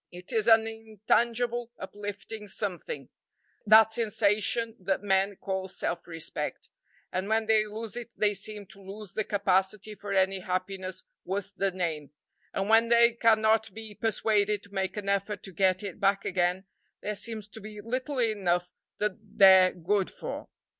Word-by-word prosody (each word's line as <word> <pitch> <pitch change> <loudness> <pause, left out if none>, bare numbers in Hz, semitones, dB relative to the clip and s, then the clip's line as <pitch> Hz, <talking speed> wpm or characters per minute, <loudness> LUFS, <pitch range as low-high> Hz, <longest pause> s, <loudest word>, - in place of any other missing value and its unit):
It 180 +4 -11
is 225 -2 +1
an 225 -1 +7
intangible, 225 +2 0
uplifting 205 +2 -7
something, 205 - -4 0.6
that 220 +1 +7
sensation 220 +1 +1
that 190 +1 -1
men 195 0 +2
call 190 0 -3
self 175 -2 -3
respect, 165 -2 -5 0.4
and 185 +2 -2
when 220 0 +2
they 215 -1 +3
lose 220 +1 -6
it 240 -1 -6
they 210 -1 +3
seem 205 +1 -4
to 195 - -15
lose 195 +1 -9
the 215 - 0
capacity 200 +1 0
for 205 -1 -8
any 190 0 +2
happiness 185 0 -4 0.2
worth 200 +1 -3
the 195 0 +1
name, 165 -6 -3 0.4
and 195 - -2
when 225 +1 +5
they 235 0 +6
cannot 220 -1 +3
be 220 -1 -7
persuaded 210 -1 +1
to 200 - -16
make 190 +1 -2
an 205 -1 -4
effort 200 +1 -1
to 195 - -9
get 185 +1 +2
it 200 -2 -6
back 195 0 +2
again, 180 +1 0 0.4
there 210 - -2
seems 215 0 -2
to 220 +2 -11
be 210 0 -9
little 255 +6 -3
enough 185 -7 +1 0.3
that 210 -2 -1
they're 190 -3 +6
good 190 +3 0
for. - - -7
205 Hz, 160 wpm, -28 LUFS, 190-220 Hz, 0.6 s, an